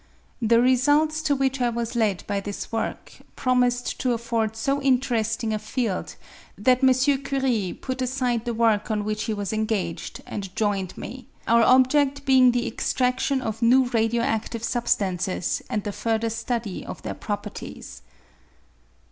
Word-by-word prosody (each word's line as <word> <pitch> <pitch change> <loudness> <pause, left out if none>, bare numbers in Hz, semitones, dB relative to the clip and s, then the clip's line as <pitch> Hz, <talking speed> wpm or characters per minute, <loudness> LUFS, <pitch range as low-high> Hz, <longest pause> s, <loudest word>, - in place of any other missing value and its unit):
The 230 0 +4
results 290 +5 +3
to 290 -2 +1
which 270 -1 0
I 245 - +3
was 235 0 -3
led 210 -5 0
by 200 -1 -1
this 205 0 -6
work 225 -1 -4 0.2
promised 250 -1 +1
to 250 -2 +1
afford 230 -2 -1
so 275 +5 0
interesting 235 -4 +1
a 215 - -1
field 215 -2 -3 0.4
that 250 +6 +3
M. 260 - +7 0.3
Curie 260 -9 -1
put 260 -1 -4
aside 250 -2 -1
the 240 - -1
work 220 -2 +2
on 210 -1 0
which 215 +1 -2
he 225 - -1
was 205 0 -3
engaged, 215 -6 -2
and 195 -2 -6
joined 200 -4 -1
me, 255 +3 -8 0.2
our 230 0 +5
objed 265 +3 +4
being 260 -2 +6
the 245 0 0
extraftion 255 +1 0
of 220 -1 -4
new 250 +2 +4
radio 230 0 +1
acftive 225 -2 -2
substances 190 -7 -1
and 210 - -1
the 205 - -3
further 225 +1 -1
study 230 -3 -3
of - - -8
their - - -3
properties. - - -7
235 Hz, 155 wpm, -24 LUFS, 215-255 Hz, 0.4 s, M